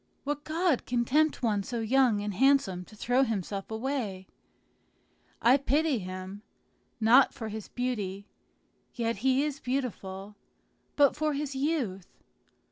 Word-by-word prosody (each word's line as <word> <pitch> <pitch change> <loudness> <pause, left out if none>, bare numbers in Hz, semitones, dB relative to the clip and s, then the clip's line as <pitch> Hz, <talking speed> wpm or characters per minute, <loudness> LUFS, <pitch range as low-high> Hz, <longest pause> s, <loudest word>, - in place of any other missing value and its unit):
"What 290 +1 -3
god 325 -3 0
can 240 -1 0
tempt 305 +2 +2
one 210 -4 +1
so 235 +4 -4
young 230 -2 +3
and 205 0 -3
handsome 210 -6 +2
to 215 - -16
throw 245 +4 +1
himself 200 -5 -2
away? 220 -5 -3 1.2
I 250 +4 +6
pity 285 0 +1
him, 185 +1 -7 0.6
not 235 +5 +5
for 220 -2 -5
his 215 -1 -6
beauty 205 -6 -3 0.7
(yet 230 -2 -1
he 260 +5 +2
is 295 -2 -3
beautiful), 210 -7 -4 0.6
but 285 -2 +4
for 305 0 0
his 280 -1 -3
youth. 265 - -1
245 Hz, 130 wpm, -29 LUFS, 205-275 Hz, 1.2 s, I